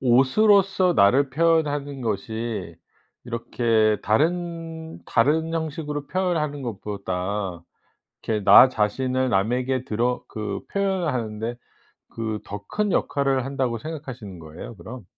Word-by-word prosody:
옷으로서 185 - +4
나를 130 +6 +4
표현하는 145 -3 +1
것이 110 +1 -3 0.5
이렇게 115 -2 +1
다른, 165 +4 -1
다른 160 +7 +2
형식으로 150 -2 -3
표현하는 160 -6 -1
것보다 100 -4 -4 0.6
이렇게 110 -2 -1
나 125 - +9
자신을 130 +4 0
남에게 125 +5 0
드러 120 +3 -1
그 105 -2 -4
표현하는데 130 - -1 0.6
그 110 -2 -3
더 100 0 -8
큰 210 - -1
역할을 135 -2 +1
한다고 130 -4 -1
생각하시는 130 - -7
거예요 80 +7 -10
그럼? 120 +2 -9
130 Hz, 265 characters per minute, -24 LUFS, 110-155 Hz, 0.6 s, 나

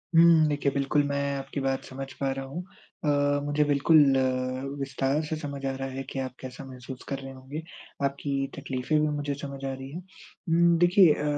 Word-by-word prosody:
हुँ, 165 -1 +7
देखिए, 145 -1 +1
बिल्कुल 140 +1 +2
मैं 140 0 -1
आपकी 135 +1 -4
बात 135 0 -1
समझ 135 +1 -6
पा 135 -1 -1
रहा 135 0 -4
हूँ। 145 +6 -5 0.4
अ, 145 -1 +3
मुझे 145 +1 +2
बिल्कुल 145 +3 +4 0.8
विस्तार 135 +2 0
से 155 - -2
समझ 140 -3 -5
आ 135 - +1
रहा 135 0 -4
है 135 +1 -5
कि 135 - -4
आप 130 -1 -3
कैसा 130 0 -8
महसूस 130 0 -9
कर 140 - -2
रहे 135 0 -8
होंगे, 130 +4 -7 0.4
आपकी 140 +1 -1 0.3
तकलीफ़ें 140 +2 0
भी 155 - +2
मुझे 145 -1 -2
समझ 140 -1 -6
आ 135 - -1
रही 135 0 -7
हैं। 170 +5 -6 0.5
उम, 170 0 +5
देखिए 175 -1 +6
अ, - - -4
140 Hz, 195 wpm, -27 LUFS, 135-150 Hz, 0.8 s, हुँ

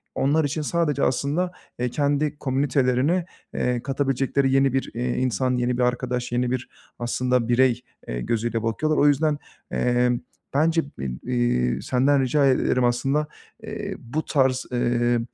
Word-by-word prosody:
onlar 150 +4 +2
için 145 +2 -2
sadece 150 -2 0
aslında, 150 +8 0 0.3
eee, 125 0 0
kendi 145 +2 0
komünitelerine 135 +4 +1 0.3
eee, 125 -1 -1
katabilecekleri 135 0 0
yeni 135 -1 +3
bir, 135 - -1
iii, 120 +1 -2
insan, 130 0 0
yeni 125 0 0
bir 125 - +2
arkadaş, 125 0 -1
yeni 125 0 0
bir 130 -1 -3 0.3
aslında 125 0 0
birey, 125 0 +3 0.3
eee, - - -3
gözüyle 115 - -1
bakıyorlar. 155 +8 0
O 145 - +5
yüzden, 145 +1 +2 0.3
eee, 125 0 +2 0.4
bence 160 +3 +3
bı, 70 - -7
iii, 60 - +1
senden 135 +2 +2
rica 140 +2 +2
ederim. 130 -1 +2
Aslında, 135 +5 +1 0.4
eee, - - -5
bu 150 +7 -4
tarz, 130 -2 +1
eee, 120 -1 +1
130 Hz, 145 wpm, -24 LUFS, 120-145 Hz, 0.4 s, O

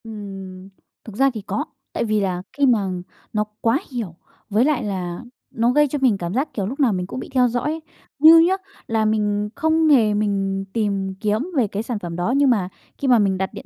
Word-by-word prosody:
Ừm, 195 -4 -9 0.3
thực 220 - -10
ra 270 +4 +4
thì 220 - -5
có, 195 - -3 0.3
tại - - -1
vì 215 -1 +1
là 185 -3 -1
khi 285 - +2
mà 220 -7 +2 0.4
nó 210 -1 +1 0.2
quá 230 +5 +2
hiểu, 220 -10 -4 0.3
với 220 +4 +3
lại 285 -5 +1
là 180 -4 -4 0.3
nó 230 +1 +1
gây 295 +3 +4
cho 290 +1 -3
mình 250 -6 +3
cảm 175 -1 -4
giác, 270 +6 -1
kiểu, 200 - -2
lúc 255 +9 -5
nào 255 -7 +3
mình 180 -1 -3
cũng 255 - -6
bị - - -8
theo 250 -2 +4
dõi 240 0 -2
ấy. 315 +2 -2 0.4
Như 320 +3 +9
nhá 340 +3 +4 0.3
là 220 -1 +1
mình 210 -1 0
không 320 0 +2
hề 235 -8 +5
mình 195 -2 -1
tìm 200 -4 -1
kiếm 210 0 0 0.2
về 240 -5 +3
cái 205 +2 -4
sản 230 -2 -3
phẩm 170 -3 -6
đó, 175 +8 -1
nhưng 280 -1 +4
mà 200 -7 +1 0.3
khi 280 - -2
mà 245 -3 +5
mình 195 -2 +2
đặt 190 0 -1
điện - - -9
215 Hz, 230 wpm, -21 LUFS, 195-255 Hz, 0.4 s, Như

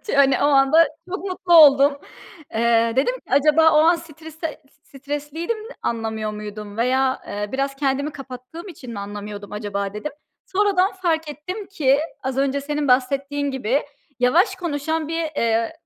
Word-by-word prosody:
Ç - - -3
hani, 270 -2 +5
o - - +3
anda 290 +3 +5 0.2
çok 380 +2 -5
mutlu 365 -1 0
oldum. 285 -3 +8 0.6
Eee, 230 0 +3
dedim 280 - +2
acaba 310 +3 +5
o 300 - +4
an 335 +2 +5
stresde 320 0 -8 0.2
stresliydim, 295 - -5 0.3
anlamıyor 220 -2 -2
muydum 210 0 -8
veya, 260 +2 +1
eee, 205 0 -4
biraz 275 +1 -1
kendimi 280 +1 -1
kapattığım 270 +7 -9
için 260 -9 -10
mi 205 - -6
anlamıyordum 205 0 -7
acaba 205 -1 -4
dedim. 300 +9 -5 0.3
Sonradan 390 -1 +2
fark 330 -4 -1
ettim 365 +8 -6
ki 285 -8 +2 0.2
az 265 0 -3
önce 275 0 +1
senin 295 0 -2
bahsettiğin 275 +3 +1
gibi 265 0 0 0.4
yavaş 355 - +3
konuşan 315 -2 -2
bir, 330 0 -2 0.2
eee, 230 +3 +1
280 Hz, 150 wpm, -22 LUFS, 240-320 Hz, 0.6 s, oldum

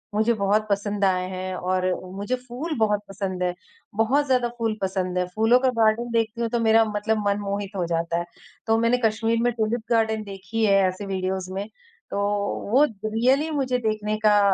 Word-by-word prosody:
मुझे 220 +2 +3
बहुत 210 0 +1
पसंद 200 0 -1
आए 185 -1 +1
हैं 185 0 -4
और 185 0 +1 0.3
मुझे 205 +6 -1
फूल 295 +7 -4
बहुत 210 -2 +2
पसंद 190 -2 -4
है। 180 -1 0 0.4
बहुत 255 +7 +2
ज़्यादा 250 -2 +2
फूल 225 -2 -1
पसंद 185 -1 -1
हैं, 180 - +1
फूलों 225 +3 +4
का 260 0 +2
गार्डन 225 +2 +2
देखती 230 0 0
हूँ 230 - 0
तो 235 - 0
मेरा 225 0 +5
मतलब 215 +1 -1
मन 200 0 +1
मोहित 200 0 -3
हो 180 -3 -1
जाता 170 0 -1
है। 175 - -4 0.4
तो 225 0 +3
मैंने 230 +2 +3
कश्मीर 225 +1 +1
में 245 - +3
ट्यूलिप 225 +1 -1
गार्डन 220 -1 +2
देखी 205 +3 -3
है 200 -2 +4
ऐसे 185 +2 -4
वीडियोज़ 190 -1 -3
में। 200 +2 -3 0.4
तो 200 - -1 0.5
वो 265 +5 +6 0.2
रियली 255 +8 +2
मुझे 265 -4 0
देखने 215 -2 -1
का, 210 -1 +4
215 Hz, 190 wpm, -24 LUFS, 195-230 Hz, 0.5 s, वो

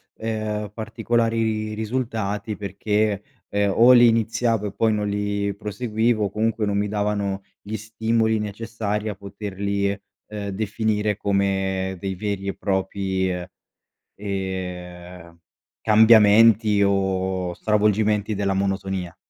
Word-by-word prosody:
ehm, 110 -2 -3
particolari 115 -1 -1
risultati 110 -2 -3
perché, 105 +1 -1 0.3
ehm, 100 -1 +1
o 120 +2 +7
li 120 -1 +8
iniziavo 115 -1 +1
e - - -5
poi 110 -1 +2
non 105 -1 -1
li 100 0 -1
proseguivo 110 +1 -1
o - - -2
comunque 110 +2 0
non 100 -1 0
mi 105 0 0
davano 100 -1 -1 0.2
gli 105 +2 -5
stimoli 110 +1 0
necessari 105 0 -3
a 105 - -4
poterli, 100 0 -3 0.4
ehm, 105 -1 -5
definire 105 +1 -1
come 95 -2 0
dei 95 +1 -3
veri 100 0 -3
e 100 - -2
propri, 95 -1 -1 0.9
ehm, 90 -3 -6 0.4
cambiamenti 110 -1 +6
o 95 -2 0
stravolgimenti 105 0 +1
della 100 -1 0
monotonia. 95 -2 -2
105 Hz, 110 wpm, -23 LUFS, 100-110 Hz, 0.9 s, li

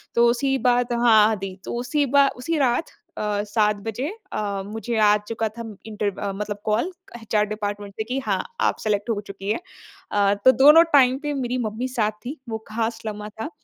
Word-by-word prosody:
तो 235 0 +5
उसी 270 +3 +1
बात 245 0 +1
हाँ 220 -2 +6
दी 195 -1 -5
तो - - -4
उसी 290 +4 -1
बा 280 +1 +4
उसी 315 +6 -2
रात 265 +3 +1 0.3
अ, 205 -1 -1
7 210 0 +1
बजे 245 +6 -2 0.3
अ, 200 -2 -2
मुझे 225 +2 -4
आ 210 -1 +5
चुका 225 -1 -1
था 230 +2 -8
म 220 -2 -8
इंटर 210 -2 -2 0.2
मतलब 205 0 -4
कॉल, 225 - +1 0.3
एचआर 210 -1 +1
डिपार्टमेंट 205 -1 -4
से 220 - -1
कि 255 +4 -3
हाँ, - - 0 0.2
आप - - +2
सेलेक्ट 210 +1 -1
हो 220 -3 0
चुकी 200 +1 -4
हैं। - - 0 0.5
अ, 200 -1 +3
तो 260 - +10
दोनों 300 +5 +8
टाइम 260 -2 +6
पे 295 - -1
मेरी 255 -2 -2
मम्मी 225 +4 -3
साथ 225 -4 0
थी, 280 +5 -5
वो 220 - -2
ख़ास 225 +1 -2
लम्हा 210 -1 -5
था - - -3
220 Hz, 200 wpm, -23 LUFS, 210-250 Hz, 0.5 s, तो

